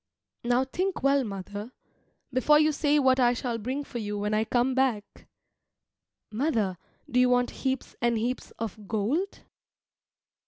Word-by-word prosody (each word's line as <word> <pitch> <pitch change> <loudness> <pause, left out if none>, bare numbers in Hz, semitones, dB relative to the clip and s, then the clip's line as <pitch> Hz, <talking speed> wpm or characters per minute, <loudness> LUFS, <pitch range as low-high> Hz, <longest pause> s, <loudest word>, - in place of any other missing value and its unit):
Now 245 +2 +2
think 370 +7 -2
well, 275 0 +4
mother, 205 +2 -6 0.6
before 280 +4 +5
you 305 +1 +4
say 295 0 +2
what 260 -2 +4
I 245 -1 +4
shall 240 -1 -3
bring 260 +6 -3
for 245 -3 -6
you 210 -1 -3
when 210 +1 -1
I 215 +1 +2
come 245 +3 +1
back. 250 -6 -1 1.0
Mother, 220 - 0 0.3
do 250 - +1
you 250 0 +5
want 245 0 +2
heaps 265 -1 -2
and 235 -1 +2
heaps 245 +3 -2
of 215 -2 -6
gold? 245 - -1
245 Hz, 150 wpm, -27 LUFS, 220-270 Hz, 1.0 s, before